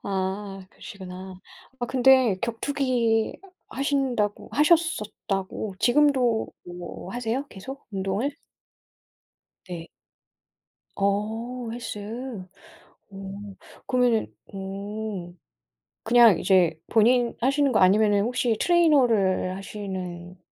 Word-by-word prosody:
아 195 0 -3
그러시구나. 185 -1 -10 0.4
아 245 - -2
근데 255 -5 +4
격투기 235 -2 0 0.3
하신다고 265 -7 -1
하셨었다고 215 - 0
지금도 250 -3 +3 0.2
뭐 175 +3 -8
하세요 245 +3 -2
계속 265 +7 -9
운동을? 200 +8 -2 1.3
네. 170 -2 -7 1.1
어 225 +5 -1
헬스. 235 -3 -6 1.1
어, 195 +1 -8 0.3
그러면은 245 -4 +1 0.2
음. 195 -2 -6 0.7
그냥 235 -4 +6
이제 175 -4 +3
본인 235 +2 +3
하시는 275 +2 +2
거 215 - +3
아니면은 205 +2 +4
혹시 240 -1 0
트레이너를 245 - +3
하시는 185 -3 -6
215 Hz, 195 characters per minute, -25 LUFS, 195-250 Hz, 1.3 s, 그냥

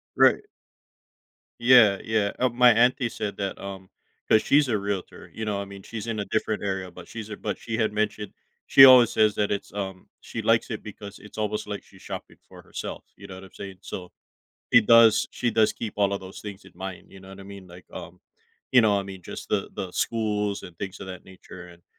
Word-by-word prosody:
Right. - - +5 1.2
Yeah, 120 -5 +6
yeah, 110 -2 0
uh, 130 - +3
my 125 0 +5
auntie 120 +2 +3
said 105 -2 -5
that, 100 -1 -4
um 95 -1 -8 0.4
'cause 110 - +5
she's 145 -1 +3
a 110 - +1
realtor, 100 -2 -5
you 110 - -6
know, 105 -2 -2
I 100 - -4
mean, 100 -1 -11
she's 115 0 -7
in 115 -2 -3
a - - -4
different 110 +1 -2
area, 95 -2 -3
but 90 - -12
she's 110 -2 -8
a 105 - -5
but 105 - -4
she 115 - -5
had 110 -2 +1
mentioned 105 0 -2 0.4
she 135 - +9
always 125 -3 +8
says 110 -1 +3
that 105 0 0
it's, 100 - -3
um 95 -2 -6
she - - -6
likes - - +2
it - - -5
because 100 -1 -10
it's 105 - -14
almost 105 0 -2
like 105 -1 -5
she's 95 - -19
shopping - - -8
for - - -14
herself, - - -7
you 100 - -12
know 95 - -9
what 95 - -11
I'm 95 - -14
saying, 95 -2 -10
so 90 -2 -7 0.6
she 115 - +9
does 115 0 +6
she 120 -2 -2
does 110 0 +3
keep 110 -3 -6
all 100 -1 +2
of 100 - -2
those 95 0 -10
things 100 -1 -9
in - - -15
mind, 95 +1 -8
you 95 - -13
know 95 0 -14
what 95 0 -11
I - - -10
mean, 100 -1 -11
like, 90 +1 -14
um, - - -9 0.5
you 125 -2 +7
know, 105 -2 +3
I - - -4
mean, 95 -1 -9
just - - -9
the - - -1
the 95 - -5
schools 105 -1 -1
and 90 - -11
things 95 -1 -6
of - - -7
that 90 -1 -9
nature, 90 -1 -12
and, 85 0 -17
100 Hz, 230 wpm, -25 LUFS, 95-110 Hz, 1.2 s, she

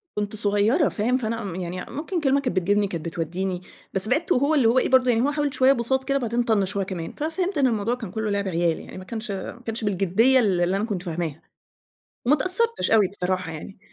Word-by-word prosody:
كنت 210 0 -2
صغيّرة 215 - +3
فاهم، 240 +4 0
فأنا 230 -2 -3
م 190 -4 -5
يعني 180 0 -5
ممكن 320 +6 -3
كلمة 275 -1 +3
كانت 255 -6 -2
بتجيبني، 200 +3 +2
كانت 170 -4 -5
بتوديني، 175 +3 -3 0.3
بس 190 +2 +1
بعدت 310 +7 0
وهو 280 +1 +3
اللي 265 -6 +4
هو 240 +3 +4
إيه - - 0
برضو، 255 -1 +4
يعني 230 -1 +3
هو 280 +4 +2
حاول 290 -2 -1
شويّة 260 +1 +5
بُساط 265 +1 0
كده 275 +1 0
بعدين 240 -2 0
طنش 205 -4 +1
هو 195 - 0
كمان، 175 -4 -5
فَفهمت 350 +5 -2
إن 275 -2 +4
الموضوع 225 0 0
كان 225 -7 -8
كلّه 220 +1 -2
لعب 200 -1 -1
عيال 170 -2 0
يعني، - - -10
ما 185 - -8
كانش 220 +2 -6
ما 200 +4 -6
كانش 225 0 -3
بالجديّة 205 +6 +3
اللي 190 -7 +2
اللي 180 +2 +1
أنا 205 - -1
كنت 200 -6 -4
فاهماها. 165 -3 -4 0.8
وما 275 +5 +5
اتأثرتش 415 +9 +1
أوي 215 -3 +5
بصراحة 185 -2 -3
يعني. 165 +5 -9
220 Hz, 225 wpm, -24 LUFS, 185-260 Hz, 0.8 s, شويّة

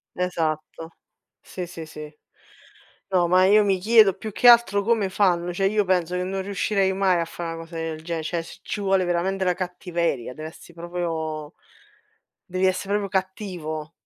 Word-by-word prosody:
Esatto, 165 -2 -3 0.4
sì 180 - -7
sì 165 -2 -8
sì. 150 0 -10 1.0
No, 180 -2 +2
ma 185 +2 +5
io 210 +2 +6
mi 195 -1 +2
chiedo 215 -1 +6
più 215 +2 -7
che 245 - +2
altro 215 -4 +5
come 215 -3 +1
fanno, 180 -3 +1
cioè 195 +2 +1
io 210 0 +2
penso 180 -1 +1
che 180 - -1
non 190 +1 -3
riuscirei 195 0 0
mai 190 -2 +2
a - - -1
fa 170 +1 -8
una 165 - -4
cosa 165 +1 -10
del 160 -1 -4
gene 165 -1 -3
cioè 170 +1 -2
c - - -12
ci 205 - -4
vuole 195 -1 +2
veramente 185 +2 0
la 180 - +3
cattiveria, 175 -8 -3
deve 155 +2 -7
essere 170 +1 -16
proprio 165 -3 -4 0.9
devi 185 0 -1
essere 185 +1 -1
proprio 200 -1 0
cattivo. 180 -5 -4
180 Hz, 175 wpm, -24 LUFS, 165-195 Hz, 1.0 s, io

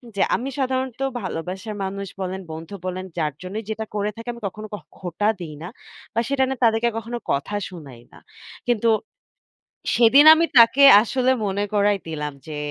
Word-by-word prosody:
যে 195 - -1
আমি 260 +3 -3
সাধারণত 260 -1 -2 0.2
ভালোবাসার 185 +4 -5
মানুষ 200 +1 -4
বলেন, 190 +1 -4
বন্ধু 160 +5 -8
বলেন 185 +1 -4
যার 150 -3 -1
জন্যই 195 +5 -5
যেটা 220 0 -3
করে 205 0 0
থাকি 230 +1 -10
আমি 235 - -12
কখনো 215 +3 -8
ক - - -1 0.2
খোঁটা 185 +3 -2
দেই 165 -4 -7
না। 175 - -5 0.5
বা 230 - 0
সেটা 275 -1 +2
নে 265 - -2
তাদেরকে 230 +1 +3
কখনো 235 +1 -5
কথা 140 +9 -2
শুনাই 140 -10 -11
না। - - -15 0.5
কিন্তু 235 -1 +2 1.1
সেদিন 250 +5 +6
আমি 330 +1 +3
তাকে 245 +4 +7 0.2
আসলে 255 +3 +1
মনে 200 +1 -1
করাই 205 0 +3
দিলাম 150 -2 -4
যে, 150 -1 -6
205 Hz, 170 wpm, -22 LUFS, 180-235 Hz, 1.1 s, তাকে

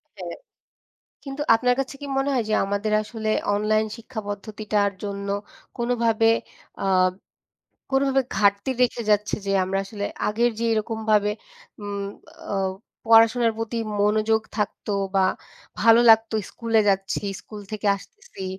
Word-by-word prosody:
হ্যাঁ। - - -7 0.9
কিন্তু 275 +1 -4
আপনার 250 +2 +2
কাছে 270 +1 -4
কি 285 - -6
মনে 270 +1 +1
হয় 245 -3 +1
যে, 215 - +1
আমাদের 205 +2 -1
আসলে 220 0 -5 0.3
অনলাইন 215 +1 +1
শিক্ষা 230 0 -7
পদ্ধতিটার 205 0 -1
জন্য 200 0 -4 0.5
কোনোভাবে 230 -2 +2 0.5
আ - - -1 1.1
কোনোভাবে 270 0 +3 0.2
ঘাটতি 200 +4 +2
রেখে 245 -1 +2
যাচ্ছে 210 0 +2
যে, 195 - -1
আমরা 190 +1 -1
আসলে 205 0 -5 0.2
আগের 235 +3 +2
যে 230 - 0
এরকম 220 +1 -2
ভাবে 210 0 +3 0.5
উম 200 -1 -4 0.5
অ - - 0 0.5
পড়াশোনার 230 +1 +5
প্রতি 225 +1 -3 0.2
মনোযোগ 215 +1 +2 0.2
থাকতো, 210 0 -2 0.2
বা 190 -1 +4 0.6
ভালো 230 +1 +7
লাগতো 225 0 +5
স্কুলে 230 -1 +1
যাচ্ছি, 195 +1 -1 0.2
স্কুল 210 +3 -10
থেকে 210 -1 -2
আসতেছি, 195 -1 -11
220 Hz, 130 wpm, -24 LUFS, 205-230 Hz, 1.1 s, ভালো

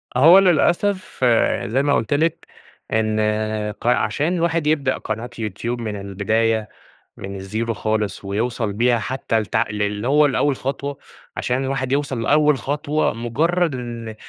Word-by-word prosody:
أهو 165 +9 +8
للأسف 185 +2 +1
يعني 120 -4 +2
زي 130 +5 +1
ما 145 0 +2
قُلت 115 - 0
لِك 160 +3 0 0.5
إن 110 -1 +1 0.6
ق - - -4
عشان 145 +6 +1
الواحد 165 -2 0
يبدأ 145 -4 +1
قناة 110 +3 -5
يوتيوب 115 +3 -3
من 110 -2 -4
البداية 110 +3 0 0.5
من 100 0 -7
الزيرو 110 +4 -3
خالص 110 -2 -2
ويوصل 110 +2 -2
بيها 120 +3 +2
حتّى 115 0 -1
لتع 110 +2 0
للي 105 +2 -2
هو 150 +2 +5
لأول 145 0 +1
خطوة، 140 +2 -4 0.4
عشان 125 +2 -1
الواحد 130 -1 -2
يوصل 140 -4 -1
لأول 150 +3 +3
خطوة 145 +3 -1
مُجرّد 160 +8 0
إن 120 -3 -6
125 Hz, 145 wpm, -21 LUFS, 110-145 Hz, 0.6 s, أهو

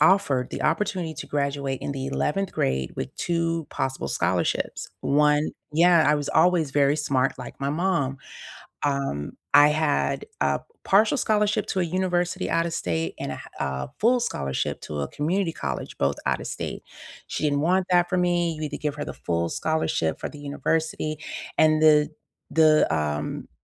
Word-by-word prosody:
offered 150 -7 +3
the - - -4
opportunity 175 +1 0
to - - -7
graduate 140 -2 -2
in - - -2
the 135 -1 -4
11th 180 +7 -1
grade 65 0 -1
with - - -5
2 165 -2 -1
possible 135 0 -2
scholarships. - - -1
1 150 +1 +3 0.2
yeah, 170 0 +6
I - - +4
was 145 -1 -3
always 165 -4 +3
very 145 +1 +3
smart 135 -3 0
like - - -9
my 140 - 0
mom. 155 -5 0 0.7
Um, 135 - -1 0.2
I 145 +1 +9
had 150 -1 +1 0.2
a - - +2 0.2
partial 215 +7 +4
scholarship 210 -2 +1
to 190 - 0
a 175 - +2
university 180 +1 -1
out 165 +1 +2
of 170 - -4
state 80 -2 -2
and - - -3
a - - -5
ha - - -11
uh, 65 -1 -2
full 245 +3 +3
scholarship 70 - -2
to 75 -1 -4
a 70 - -2
community 170 +4 -1
college, 70 - -5
both 70 +1 +1
out - - +1
of - - -6
state. - - -5 0.5
She - - -3
didn't 145 -1 +2
want 185 +4 +2
that 175 -1 +4
for 185 - 0
me, 175 -2 +1
"You 155 - -7
either 150 - -4
give 150 -2 -2
her 145 - -3
the - - -6
full 85 -1 -2
scholarship 155 - 0
for - - -5
the 150 - -11
university" 155 +1 -1 0.4
and 155 0 +5
the 150 -1 +6 0.4
the, 155 -1 +5
um, 75 -1 -2
155 Hz, 175 wpm, -25 LUFS, 140-175 Hz, 0.7 s, I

